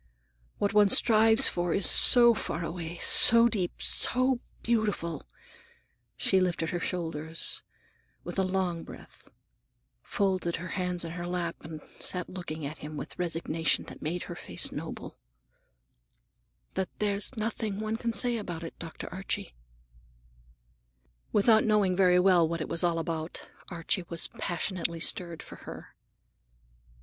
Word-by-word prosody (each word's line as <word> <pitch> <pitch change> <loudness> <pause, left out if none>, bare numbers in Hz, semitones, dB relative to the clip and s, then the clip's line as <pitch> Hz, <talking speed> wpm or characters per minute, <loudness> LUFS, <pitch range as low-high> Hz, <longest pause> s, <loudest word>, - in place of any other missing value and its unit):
What 200 0 -1
one 205 -1 +5
strives 225 +3 +6
for 175 -1 -1
is 200 - +5
so 235 -1 +7
far 170 -6 -4
away, 170 0 -6
so 230 +6 +7
deep, 195 -7 -3
so 255 0 +3 0.2
beautiful"—she 170 - -3
lifted 170 -3 -1
her 175 - -2
shoulders 165 -2 -2 0.6
with - - -5
a - - +2
long 185 -3 -2
breath, - - -14 0.7
folded 185 -4 -1
her 180 +2 -7
hands 180 -2 -2
in 165 - -6
her 175 +1 -6
lap 175 -1 -3
and 155 -1 -9 0.2
sat 180 -1 -4
looking 160 -5 -6
at 150 +3 -7
him 150 +1 -8
with - - -7
a - - -23
resignation 165 -2 -1
that - - -12
made 170 +4 -3
her - - -8
face - - -1
noble,—"that - - -11
there's 205 +4 -1
nothing 215 -2 -3
one 215 +1 -3
can 235 0 -2
say 235 +2 +1
about 175 -6 -6
it, 165 - -7
Dr. 165 -2 -8
Archie." 185 - -5 1.8
Without 220 +1 +4
knowing 210 -4 +2
very 180 -1 +4
well 180 -3 +4
what 170 0 -3
it - - -4
was 170 +2 0
all 170 -1 +1
about, 165 0 -5 0.2
Archie 175 +1 -3
was 170 -1 -3
passionately 175 -3 -2
stirred 170 -1 -2
for - - -12
her. - - -11
180 Hz, 140 wpm, -28 LUFS, 165-200 Hz, 1.8 s, so